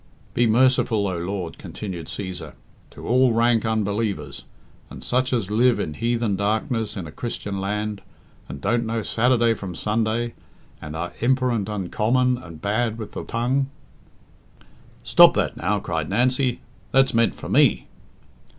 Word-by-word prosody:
"Be 120 - +3
merciful, 115 -3 +3
O 95 - -2
Lord," 90 -1 -4
continued 90 -6 -7
Cæsar, 95 -3 -6 0.4
"to - - -10
all 125 0 +4
rank 115 0 +2
unbelievers, 100 -10 -2 0.4
and - - -10
such 130 +1 0
as 110 -6 -1
live 120 +3 +3
in 75 - -2
heathen 115 +1 0
darkness 110 +2 -1
in 95 - -4
a 75 - -8
Christian 100 -2 -4
land, 105 +1 -2 0.5
and - - -6
don't 120 - 0
know 115 -1 -2
Saturday 120 0 +2
from 95 -5 -7
Sunday, 110 +3 -1 0.5
and 75 +1 -7
are 85 +2 -3
imper 130 +1 +2
ent 105 -3 -2
uncommon 115 +6 +1
and 85 -9 -11
bad 110 +2 0
with 110 -2 -7
the - - -6
tongue 130 +4 0 0.7
" - - -28
"Stop - - +7
that - - 0
now." 100 +5 0
cried 80 -5 -3
Nancy, 125 +3 +1 0.3
"that's 135 0 +4
meant 115 0 +2
for - - -8
me." - - +3
110 Hz, 150 wpm, -23 LUFS, 100-120 Hz, 0.7 s, Stop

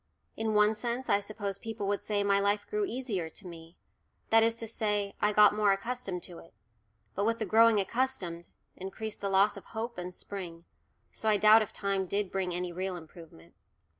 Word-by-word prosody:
In 220 -1 -1
one 210 +1 +5
sense 240 +3 -3
I 200 - +5
suppose 205 -1 -5
people 225 -3 -5
would 200 0 0
say 205 -1 0
my 200 0 +3
life 205 +1 +1
grew 425 -1 -1
easier 225 - -3
to 195 - -11
me, 165 -1 -11 0.5
that 225 0 +7
is 230 0 +3
to 230 - -3
say 210 -2 -1
I 210 - +3
got 210 0 +6
more 210 -1 +3
accustomed 195 -3 -4
to 175 -2 -8
it, 165 - -17 0.6
but 200 - -1
with 230 +2 +1
the 220 - -2
"growing 225 +2 +5
accustomed," 195 -6 -2 0.3
increased 200 +3 -6
the 200 - -1
loss 195 +1 +3
of 200 - -11
hope 230 -1 -5
and 180 0 -5
spring, 175 -3 -7 0.5
so 220 - -2
I 210 - +4
doubt 215 +2 +7
if 215 - -3
time 195 -2 -1
did 200 0 -1
bring 190 -2 -1
any 175 0 -3
real 185 +1 -3
improvement. 160 - -13
205 Hz, 195 wpm, -30 LUFS, 185-220 Hz, 0.6 s, that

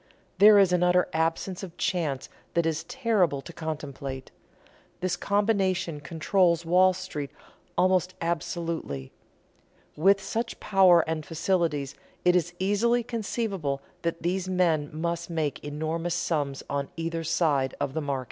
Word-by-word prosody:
There 210 +1 +9
is 195 -3 +5
an 180 - +2
utter 180 0 +4
absence 165 +3 -1
of 185 -4 -9
chance 150 -7 -1 0.3
that 170 -1 +2
is 160 -1 -1
terrible 225 - +1
to 170 - -10
contemplate. 140 -4 -6 0.7
This 185 0 0
combination 195 -6 0
controls 170 +3 +1
Wall 185 +2 +5
Street 180 -6 -5 0.5
almost 185 0 +2
absolutely. 165 - -3 0.8
With 195 +5 +4
such 230 +5 -3
power 190 -4 +5
and 160 -1 -3
facilities 160 -4 -1 0.3
it 180 0 +5
is 175 0 0
easily 220 +6 +2
conceivable 210 - -2 0.2
that 170 0 -3
these 185 +2 -1
men 165 -5 +1
must 170 +2 -3
make 160 -4 -2
enormous 160 +3 -2
sums 145 -6 -1
on 140 -1 -2
either 165 0 -2
side 145 -5 +1
of 135 - -2
the 160 - -2
market." 140 -2 -1
170 Hz, 135 wpm, -27 LUFS, 155-185 Hz, 0.8 s, There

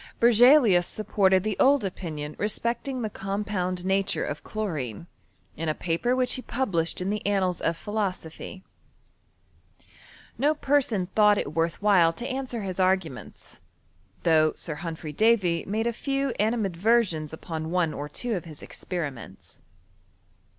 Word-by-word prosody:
Berzelius 235 -5 +6
supported 190 -3 +2
the 215 -2 -1
old 275 -4 +4
opinion 155 -5 -5
respecting 235 +5 -2
the 215 - -1
compound 195 -3 -3
nature 195 +1 +1
of 145 - -5
chlorine, 160 - -4 0.5
in 160 +1 -2
a 155 - 0
paper 180 +9 0
which 255 -1 +1
he 255 - -3
published 190 -12 -1
in 190 +2 -1
the 210 -1 -3
Annals 190 -3 0
of 165 0 0
Philosophy. 190 -3 -4 1.8
No 295 +4 +3
per 290 0 +3
son 210 -8 -1
thought 210 -1 +5
it 145 - -3
worth 165 +4 -1
while 185 -6 +5
to 240 +9 -5
answer 260 -4 -4
his 190 -1 -5
arguments, 185 -8 -2 0.6
though 155 -2 +4
Sir 160 - -4
Humphry 160 -1 -6
Davy 195 -4 +2
made 215 +3 -1
a 235 - 0
few 275 +3 -1
animad 215 -4 0
versions 185 -6 +2
upon 160 0 -5
one 175 -2 +1
or 145 +1 -5
two 235 - -3
of 180 - -5
his 155 -3 -10
experiments. 140 - -6
190 Hz, 145 wpm, -26 LUFS, 165-225 Hz, 1.8 s, Berzelius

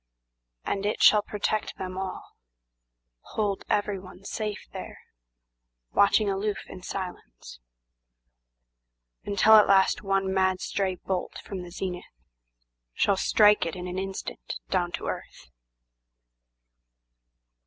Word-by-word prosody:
And 195 - -1
it 210 +1 0
shall 210 - +8
protect 210 +1 -2
them 185 -1 -5
all, 190 0 -5 1.0
Hold 205 -3 0
everyone 195 -2 -2
safe 210 -1 -4
there, - - -7 0.9
watching 200 +1 +4
aloof 200 +1 -2
in 185 - -10
silence; 180 - -7 1.7
Until 215 +2 +6
at 210 - +6
last 195 -1 +4
one 195 -1 0
mad 190 -1 +2
stray 190 -2 -1
bolt 180 +1 -4
from 195 -2 -5
the 180 - -9
zenithShall - - -5
strike 210 -1 +5
it 165 - -4
in 180 0 -6
an 180 +1 -3
instant 195 0 -5 0.2
down 175 -2 +1
to - - -4
earth. 65 - -6
190 Hz, 110 wpm, -27 LUFS, 180-200 Hz, 1.7 s, shall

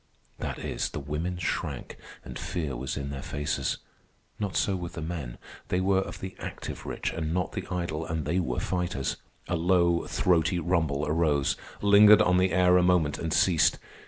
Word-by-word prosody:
That - - -3
is, - - -3
the - - -5
women 75 +5 -3
shrank, 90 - -3 0.3
and - - -7
fear 75 -7 -3
was 65 +4 -4
in 70 0 -4
their 70 -1 -5
faces. 75 +2 -2 0.6
Not 100 -3 -3
so 100 - +1
with 90 -2 -5
the 85 - -6
men. 80 -7 -5 0.3
They 90 - 0
were 95 +1 +3
of - - -7
the 95 0 -6
active - - -6
rich, - - -3
and 80 0 -2
not 90 -1 -1
the - - -5
idle, 85 -4 -2
and 80 -2 -2
they 85 +5 +1
were 65 -9 -1
fighters. 90 -7 -2 0.3
A 85 - 0
low, 85 0 +2
throaty 85 -1 +2
rumble 80 -4 0
arose, 75 -3 +1 0.3
lingered 105 +1 +8
on 90 0 +3
the 95 0 +2
air 90 0 +5
a - - +5
moment, 90 -5 +2
and 80 - -3
ceased. 85 0 +4
85 Hz, 185 wpm, -28 LUFS, 75-90 Hz, 0.6 s, lingered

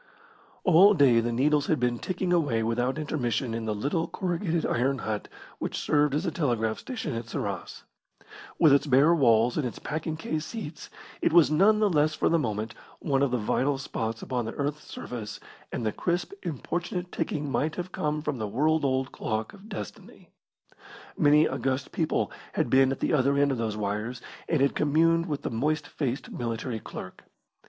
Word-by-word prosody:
All 190 +4 +7
day 135 -7 +5
the 120 +1 0
needles 145 +4 +2
had 155 - +1
been 120 -1 0
ticking 185 -1 -1
away 140 -10 +2
without 120 +4 0
intermission 130 -5 -1
in 115 0 -3
the 110 -1 -1
little 145 +10 -1
corrugated 170 -2 -1
iron 135 +3 +1
hut 110 -2 -3 0.3
which - - -3
served 145 -1 +2
as 155 +5 -1
a 170 - 0
telegraph 120 -9 0
station 220 - -4
at 115 0 -4
Sarras. - - -4 0.7
With 155 -4 +6
its 140 +2 +3
bare 140 +5 +5
walls 120 -6 +4
and 135 - 0
its 120 - -7
packing 155 +1 -4
case 155 -1 -3
seats, 175 -6 -7 0.3
it - - +2
was 165 -3 +6
none 200 +7 +5
the 215 - +4
less 155 -4 +2
for - - +1
the 170 - +3
moment 110 -4 -2 0.2
one 140 -4 0
of 140 - +3
the 125 - 0
vital 135 +5 0
spots 115 -4 -4
upon 125 -3 -2
the 115 - -5
earth's 145 +1 -3
surface, 110 -4 -6 0.3
and 115 - -3
the 110 - +1
crisp, 175 - -2
importunate 175 +4 -4
ticking 145 -2 -2
might 155 +3 0
have 180 +1 -5
come 150 -2 -2
from 150 -5 -2
the 110 - -2
world 150 +9 +1
old 130 -1 0
clock 110 -1 -3
of 205 +2 -14
Destiny. - - -9 0.9
Many 150 0 +5
august 135 0 -2
people 160 -2 0 0.2
had - - 0
been 135 0 +5
at 135 - -4
the - - +1
other 140 -1 +3
end 140 0 +3
of 130 - -2
those 110 -2 -2
wires, 105 +4 -3 0.3
and 160 -5 +2
had 140 - +3
communed 165 +3 +2
with 145 -3 -3
the - - -2
moist 150 +6 0
faced 135 -2 -3
military 115 0 -3
clerk. 95 - -9
140 Hz, 185 wpm, -27 LUFS, 120-160 Hz, 0.9 s, All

